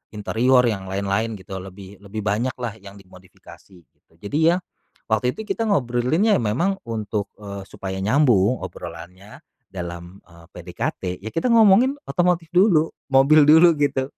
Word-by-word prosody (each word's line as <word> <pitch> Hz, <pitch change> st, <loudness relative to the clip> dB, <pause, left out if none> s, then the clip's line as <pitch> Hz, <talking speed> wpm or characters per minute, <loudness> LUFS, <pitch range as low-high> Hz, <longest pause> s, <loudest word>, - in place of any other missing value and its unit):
interior, 125 Hz, +5 st, +2 dB
yang 100 Hz, -5 st, -2 dB
lain-lain, 100 Hz, +3 st, -2 dB
gitu. 95 Hz, 0 st, -8 dB
Lebih 95 Hz, +1 st, -12 dB
lebih 105 Hz, +2 st, -7 dB
banyak 115 Hz, +5 st, -1 dB
lah, 120 Hz, -4 st, -4 dB
yang 100 Hz, 0 st, -12 dB
dimodifikasi. 95 Hz, 0 st, -17 dB, 0.4 s
Jadi 100 Hz, -, -4 dB, 0.2 s
ya, -, -, 0 dB, 0.5 s
waktu 125 Hz, +3 st, +1 dB
itu 220 Hz, -, -6 dB
kita 225 Hz, +1 st, -2 dB
ngobrolinnya 150 Hz, -, +1 dB
memang, 170 Hz, -, -1 dB
untuk, 105 Hz, -2 st, -3 dB
eee, 100 Hz, -1 st, -8 dB
supaya 95 Hz, -1 st, -6 dB
nyambung, 120 Hz, -1 st, +3 dB
obrolannya 90 Hz, +5 st, -10 dB, 0.3 s
dalam, 85 Hz, 0 st, -8 dB
eee, 85 Hz, -1 st, -18 dB
PDKT, 90 Hz, -1 st, -5 dB
ya 110 Hz, -, -6 dB
kita 165 Hz, -, -2 dB
ngomongin 225 Hz, +4 st, +5 dB, 0.2 s
otomotif 175 Hz, -2 st, 0 dB
dulu, 175 Hz, -5 st, +4 dB, 0.2 s
mobil 140 Hz, +3 st, +6 dB
dulu, 160 Hz, +2 st, +6 dB
gitu. 140 Hz, -2 st, -1 dB
110 Hz, 140 wpm, -22 LUFS, 95-155 Hz, 0.5 s, mobil